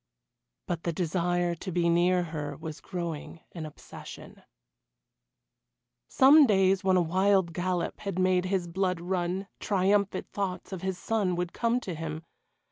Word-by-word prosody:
But 170 -2 -3
the 170 - -1
desire 175 +1 0
to 185 +3 -6
be 170 0 +1
near 175 +1 +3
her 150 -4 -5
was 155 -3 -7
growing 170 -2 -5
an 160 -3 -6
obsession. 150 - -11 1.7
Some 285 +2 +7
days 195 -2 +3
when 190 -1 +3
a 180 - +3
wild 190 +1 +2
gallop 180 0 -2
had 195 -3 -4
made 185 0 +2
his 185 -1 0
blood 180 0 -1
run, 180 +2 -2
triumphant 200 0 +1
thoughts 195 -2 -4
of 190 -3 -5
his 190 -1 -2
son 200 -2 0
would 175 0 -3
come 235 +1 +1
to 185 - -5
him. 160 0 -5
180 Hz, 145 wpm, -28 LUFS, 170-190 Hz, 1.7 s, Some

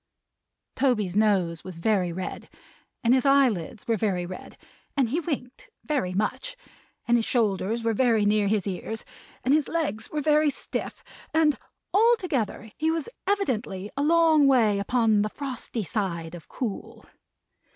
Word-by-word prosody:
Toby's 215 -9 +1
nose 190 -6 +2
was 185 -3 -8
very 185 -1 +1
red, 185 +2 -6 0.5
and 235 +1 +4
his 260 -1 +3
eyelids 250 - +2
were 230 -1 +2
very 190 -5 0
red, 185 +1 -9 0.4
and 260 -4 +2
he 300 +8 0
winked 280 -7 -5
very 275 -12 -1
much, 255 - -2 0.5
and 240 0 +4
his 225 - -1
shoulders 220 -1 0
were 225 0 +1
very 225 -2 +3
near 205 0 +3
his 210 -1 +1
ears, 205 +3 -4 0.4
and 260 - +3
his 300 -1 +2
legs 295 -10 -2
were 305 - -2
very 300 +1 +3
stiff, 280 - -5 0.3
and 310 -3 +4 0.4
altogether 360 - +1
he 315 +1 +1
was 330 +7 -1 0.2
evidently 235 - -1
a 280 - -1
long 315 -1 +5
way 225 -7 +4
upon 220 0 +2
the 210 - 0
frosty 250 -4 -5
side 170 -2 -3
of 170 -3 -10
cool. 230 -6 -6
230 Hz, 150 wpm, -26 LUFS, 200-280 Hz, 0.5 s, long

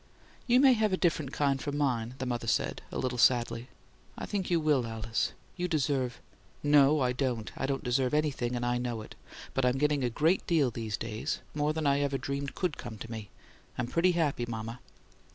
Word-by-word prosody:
"You 245 +1 +5
may 265 -1 +7
have 215 -3 +2
a 185 - +2
different 155 -6 0
kind 140 -2 +1
from 145 0 -3
mine," 125 -4 0
the 130 - -3
mother 120 -2 -2
said, - - 0
a - - -4
little 125 -1 -2
sadly. 120 0 +3 0.5
"I - - -4
think 195 -3 -2
you 170 -2 +3
will, 150 -6 +2
Alice. 115 0 -2 0.2
You 180 0 -1
deserve 135 -6 0 0.2
" - - -31
"No, 145 0 +5
I 125 -1 +2
don't. 125 -4 -2
I 135 - -2
don't 135 -1 -2
deserve 125 +1 +1
anything, 135 -5 0
and 120 0 -1
I 120 0 +1
know 120 -3 -3
it. - - -11 0.4
But 135 - 0
I'm 125 +1 +2
getting 145 -1 +2
a 125 - +2
great 160 +10 +1
deal 150 -7 +3
these 110 -3 -3
days 115 +6 -3
more 150 0 +1
than 155 0 -2
I 140 0 +3
ever 140 -1 0
dreamed 140 +1 -4
COULD 180 -6 -1
come 120 -3 -7
to 115 +2 -8
me. 110 -3 -6 0.5
I'm 120 - 0
I'm 120 - -10
pretty 180 +2 +3
happy, 145 -8 0
mama!" 115 +1 -5
135 Hz, 215 wpm, -30 LUFS, 120-150 Hz, 0.5 s, may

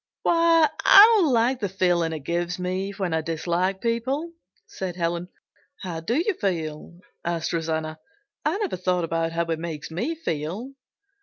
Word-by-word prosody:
"Why, 335 -1 +4 0.2
I 430 +3 +9
don't 325 -7 +3
like 245 +2 +2
the 200 -4 -2
feeling 175 -3 +1
it 155 -2 -5
gives 175 +4 -2
me 185 +2 -2
when 195 -4 -3
I 160 - +1
dislike 170 +4 -1
people," 260 +8 -1 0.3
said 185 -2 -6
Helen. 170 0 -2 0.5
"How 175 -3 -4
do 190 +9 -2
you 355 +8 +1
feel?" 170 -2 -3 0.2
asked 170 -1 -2
Rosanna. 160 -1 -2 0.4
"I 305 +6 0
never 410 - -2
thought 180 -1 0
about 165 0 -1
how 170 0 0
it 165 -1 -2
makes 160 -2 -6
me 235 - -2
feel." 190 - -4
180 Hz, 160 wpm, -24 LUFS, 165-235 Hz, 0.5 s, I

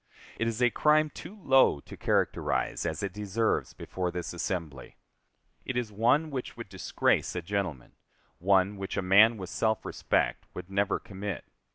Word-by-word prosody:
It 115 - +1
is 115 +2 -1
a 120 - +4
crime 155 +2 +3
too 205 - -10
low 130 - +5
to - - -11
characterize - - 0
as 80 +2 -3
it 100 -2 -3
deserves 105 +2 -1
before 90 -1 -3
this 90 -1 -5
assembly. 85 -6 -4 0.7
It 130 - -3
is 120 -3 -2
one 125 +9 +2
which 130 -3 -5
would 115 -4 -8
disgrace 95 -1 0
a 90 - -2
gentleman 90 -8 -3 0.5
one 95 +2 +3
which 95 0 -5
a - - 0
man 105 +5 +6
with 95 -2 -7
self 110 -2 0
respect - - -1
would 90 +1 -8
never 100 0 +1
commit. 100 -2 -6
100 Hz, 165 wpm, -29 LUFS, 90-115 Hz, 0.7 s, man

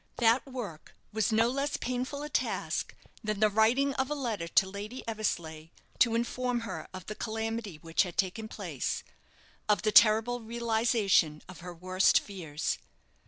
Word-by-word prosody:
That 235 +3 +3
work 220 - -7 0.2
was 220 +2 +1
no 225 +1 +4
less 275 +3 -1
painful 255 +3 -3
a 300 - -5
task - - -1 0.3
than 215 -1 -2
the 215 0 +5
writing 240 +7 +3
of 265 0 0
a 295 - -1
letter 225 -11 -3
to 190 +3 +4
Lady 205 +7 -7
Eversleigh, 165 -8 -3 0.3
to 230 -2 +4
inform 245 +1 -1
her 230 - -6
of 185 -2 -8
the 215 - -5
calamity 220 -4 -3
which 165 0 +2
had 180 -3 -2
taken 200 +3 -1
place - - -3 0.7
of 205 -4 +3
the 215 - +2
terrible 225 +3 +6
realization 225 -8 +1
of 185 - -11
her 180 0 -8
worst 185 +2 +3
fears. 165 -7 -4
220 Hz, 160 wpm, -30 LUFS, 190-240 Hz, 0.7 s, terrible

